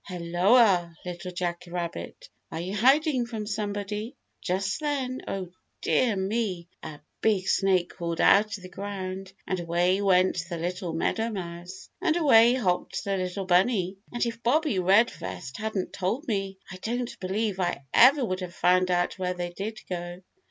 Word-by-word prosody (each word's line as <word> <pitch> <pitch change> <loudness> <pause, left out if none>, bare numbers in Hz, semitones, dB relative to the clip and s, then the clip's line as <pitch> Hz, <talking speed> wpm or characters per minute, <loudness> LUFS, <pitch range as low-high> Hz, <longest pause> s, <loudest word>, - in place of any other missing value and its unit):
"Helloa, 180 +1 +3
Little 180 0 -5
Jack 175 0 -3
Rabbit. 175 - -5 0.2
Are 160 - -4
you 185 +4 -4
hiding 265 - +3
from 220 -3 -5
somebody?" 210 +2 -3 0.3
Just 190 +2 -1
then, 275 -4 -2
oh 185 -3 -4 0.3
dear 235 -5 +2
me! 190 -3 -2
a 150 -2 -9 0.2
big 200 -4 +2
snake 185 -4 +2
crawled 170 -2 -4
out 215 +2 +4
of 190 - -16
the - - -7
ground 190 -1 -6
and 185 - -2
away 175 +3 +1
went 185 -3 +3
the 170 - -3
little 175 +1 -3
meadowmouse, 180 -2 -3
and 345 -3 +2
away 240 -7 +6
hopped 185 -8 -1
the 200 -1 -1
little 185 +1 -3
bunny, 185 +1 +2 0.2
and 240 0 0
if 230 0 -4
Bobbie 275 - +2
Redvest 175 - +1
hadn't 215 -4 -3
told 210 - -2
me, 195 -3 -2
I 190 - -7
don't 240 +5 -4
believe 195 +1 -2
I 175 -6 -1
ever 265 +2 +7
would 185 -4 -2
have 180 -2 -7
found 185 +1 +3
out 175 +1 0
where 180 -1 -1
they 175 0 -4
did 215 +4 -5
go. 175 0 -5
190 Hz, 160 wpm, -27 LUFS, 180-220 Hz, 0.3 s, ever